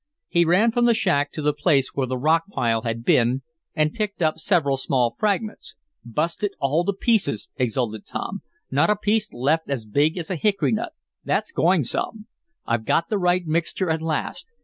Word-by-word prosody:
He 170 0 +3
ran 195 +8 +4
from 240 +1 +2
the 235 -1 +4
shack 145 -9 +1
to 155 - -5
the 150 0 +2
place 145 -2 +2
where 135 -2 -1
the 130 +1 -2
rock 160 +5 +2
pile 115 - 0
had 115 -1 -3
been, 125 +2 +3 0.3
and 155 -1 +1
picked 210 -2 -3
up 155 0 +1
several 155 -6 +2
small 130 -3 0
fragments. 215 +1 -1 0.3
"Busted 165 - -2
all 145 +5 +1
to 200 - +1
pieces!" 195 - 0
exulted 120 -4 -1
Tom 200 0 -4
Swift. 340 0 -45
"Not - - +3
a 210 - +4
piece 210 +1 0
left 145 +6 0
as 130 -6 -2
big 145 - +1
as 170 +1 -4
a - - 0
hickory 200 +4 +1
nut. 230 +9 -2 0.3
That's - - -1
going - - +3
some! 215 -1 -3 0.4
I've 115 -1 -1
got 165 +8 +1
the 210 - 0
right 180 0 +2
mixture 165 +2 -1
at 160 0 -1
last. 160 - -3
160 Hz, 195 wpm, -23 LUFS, 135-200 Hz, 0.4 s, ran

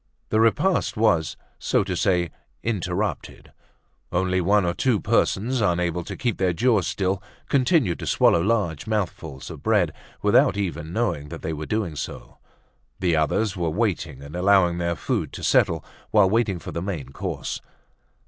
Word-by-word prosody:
The 110 - +2
repast 115 - +2
was, 85 -8 +2 0.2
so - - +1
to 95 -2 -3
say, 90 -2 +1 0.3
interrupted; 100 -2 -3 0.6
only 95 +1 +1
one 100 +2 +3
or 85 - 0
two 120 -1 +1
persons, 120 +8 +1
unable 90 -3 +1
to - - -6
keep 120 -5 -1
their 95 -2 +2
jaws 110 +1 +2
still, 95 0 -1 0.3
continued 130 - +2
to - - -5
swallow 85 - +4
large 100 -6 0
mouthfuls 85 -9 -3
of 80 -4 -9
bread, 100 -8 +2 0.3
without 100 - +4
even 85 -5 -3
knowing 90 -9 -1
that 80 - -8
they 80 - -2
were 75 0 -5
doing 105 -8 -1
so. 70 - -7 0.6
The 90 -3 +2
others 95 +7 +1
were 85 -3 -1
waiting 85 - -2
and 70 +3 -9
allowing 90 -2 +3
their 85 0 0
food - - -2
to - - -7
settle - - +2 0.2
while 105 -3 +5
waiting 110 -4 +1
for - - -8
the 85 - -3
main 85 -9 -4
course. 70 - -4
90 Hz, 160 wpm, -24 LUFS, 85-110 Hz, 0.6 s, while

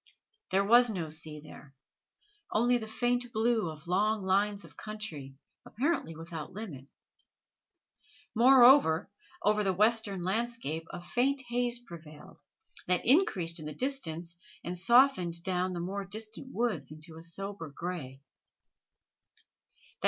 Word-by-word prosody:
There 195 +1 +2
was 240 +3 +6
no 170 -7 -4
sea 155 -1 -7
there 150 -2 -14 0.8
only 240 +3 +3
the 220 - -7
faint 245 +2 -1
blue 220 -4 +1
of 155 0 -10
long 205 +4 +1
lines 200 +1 +1
of 150 -3 -16
country, 160 -12 -7 0.3
apparently 260 - -2
without 165 +1 -8
limit. 175 -11 -8 1.5
Moreover, 245 - +6 0.3
over 210 0 +3
the 190 -2 0
western 210 -2 +1
landscape 190 -6 -2
a 175 - -8
faint 265 +8 +1
haze 245 0 0
prevailed, 155 -5 -12 0.5
that 180 -1 +1
increased 190 - +3
in 155 - -7
the 150 - -7
distance 170 - -3 0.3
and 175 - -4
softened 185 -5 +4
down 185 0 -1
the 175 - -4
more 195 +3 -3
distant 215 +5 -4
woods 215 - -1
into 155 +2 -11
a 165 - -10
sober 185 0 -6
gray. 145 -4 -6
190 Hz, 125 wpm, -30 LUFS, 165-230 Hz, 1.5 s, was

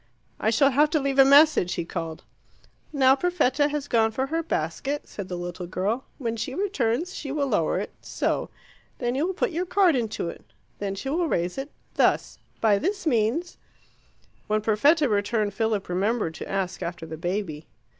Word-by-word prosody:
"I 220 - +1
shall 275 +5 +4
have 295 +3 +4
to 310 - +1
leave 275 -1 0
a - - +11
message," 280 - +5
he 170 - -3
called. 165 -2 -5 0.7
"Now 265 -3 +5
Perfetta 290 -3 +2
has 295 -1 -3
gone 225 -3 +3
for 260 +4 -2
her 325 +4 -1
basket," 275 - -3
said 200 -3 -7
the 180 - -4
little 175 0 -5
girl. 200 +8 -2
"When 230 -5 -2
she 230 +4 -4
returns 345 - -1
she 280 - -5
will 285 0 0
lower 275 - +1
it - - -3
so. - - -2 0.5
Then 240 -1 -1
you 290 +6 0
will 375 - -3
put 435 - 0
your 350 +3 -2
card 360 -3 +4
into 225 -7 -2
it. - - -8 0.4
Then 195 -1 -3
she 270 +7 -5
will 340 +2 +1
raise 175 - -1
it 275 +2 -5 0.2
thus. - - +1 0.2
By 210 -3 +4
this 390 +4 -2
means 255 +6 0 0.5
" - - -36
When 215 0 +1
Perfetta 285 +9 +3
returned, 205 -1 0
Philip 215 -1 -1
remembered 190 0 0
to 160 - -8
ask 195 -2 -2
after 170 -1 -5
the 160 0 -7
baby. 170 -2 -3
235 Hz, 185 wpm, -25 LUFS, 195-295 Hz, 0.7 s, a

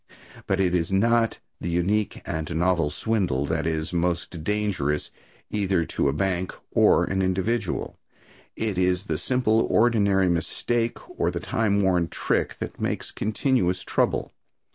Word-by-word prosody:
But 95 - +1
it 90 -2 +2
is 85 0 0
not 115 +3 +2 0.2
the 85 - -3
unique 95 +5 0
and 80 -2 -3
novel 85 -2 +2
swindle 90 - 0
that 75 - -1
is 80 +2 -2
most 85 -1 -1
dangerous, 95 -7 -1 0.4
either 95 -5 +1
to 70 - 0
a - - +2
bank 90 +4 -1 0.2
or - - +5
an 95 0 -1
individual. 95 +6 -1 0.6
It 105 -4 -2
is 90 +1 +1
the 80 -5 -2
simple, 115 0 +2
ordinary 100 -5 +3
mistake 115 +7 -1
or 85 - +2
the 90 -1 -3
time 105 -1 +1
worn 90 -3 +2
trick - - -1
that - - -6
makes - - -2
continuous 105 -5 0
trouble. - - 0
95 Hz, 140 wpm, -25 LUFS, 85-105 Hz, 0.6 s, or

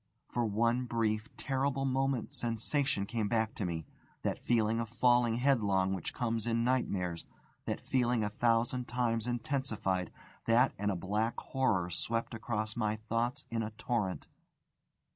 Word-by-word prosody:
For 120 - +1
one 115 +4 +2
brief, 110 -2 0
terrible 135 0 0
moment 135 -1 0
sensation 120 -1 0
came 110 0 -1
back 110 0 +1
to 105 - -3
me. 80 -3 -3 0.4
That - - -1
feeling 115 -1 +2
of 115 -1 -2
falling 120 0 +3
headlong 105 -8 +2
which 95 -4 -3
comes 115 -3 -1
in 115 0 +2
nightmares, 95 -9 0 0.4
that - - -2
feeling 125 -3 +2
a 105 - -1
thousand 120 +3 +1
times 120 -2 0
intensified, 115 - -1 0.3
that 115 +1 +4
and 105 0 +1
a 100 - 0
black 105 +6 -1
horror 100 -10 0
swept 115 +4 -2
across 110 -1 -2
my 110 -2 0
thoughts 115 +3 -2
in 115 -1 0
a 110 - -2
torrent. 105 -7 -1
115 Hz, 145 wpm, -33 LUFS, 105-125 Hz, 0.4 s, that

